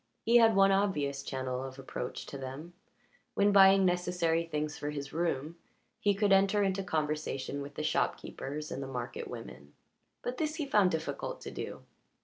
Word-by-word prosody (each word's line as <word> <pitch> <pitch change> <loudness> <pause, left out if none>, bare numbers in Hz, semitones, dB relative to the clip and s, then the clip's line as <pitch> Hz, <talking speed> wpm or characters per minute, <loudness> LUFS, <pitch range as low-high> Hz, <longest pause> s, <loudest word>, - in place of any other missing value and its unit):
He 235 +1 +6
had 225 -2 +6
one 195 0 +6
obvious 150 -9 +1
channel 130 -2 -3
of 135 0 -7
approach 130 -2 -5
to - - -9
them; 135 +6 -7 0.6
when 205 +1 +4
buying 195 -1 +7
necessary 175 -2 +1
things 150 -2 -3
for 145 - -4
his 140 -2 -5
room, 165 -1 -1 0.4
he 205 -1 +2
could 205 0 +2
enter 195 +1 +4
into 195 0 0
conversation 150 -4 -2
with 140 0 -8
the - - -3
shopkeepers 150 +3 -2
and 135 - -4
the 135 - -5
market 125 -2 -5
women, 70 +3 -9 0.5
but 250 +1 -3
this 310 +1 -1
he 305 - -2
found 210 -8 +4
it - - +2
difficult 145 -3 -5
to - - -7
do. - - -6
160 Hz, 175 wpm, -31 LUFS, 140-195 Hz, 0.6 s, buying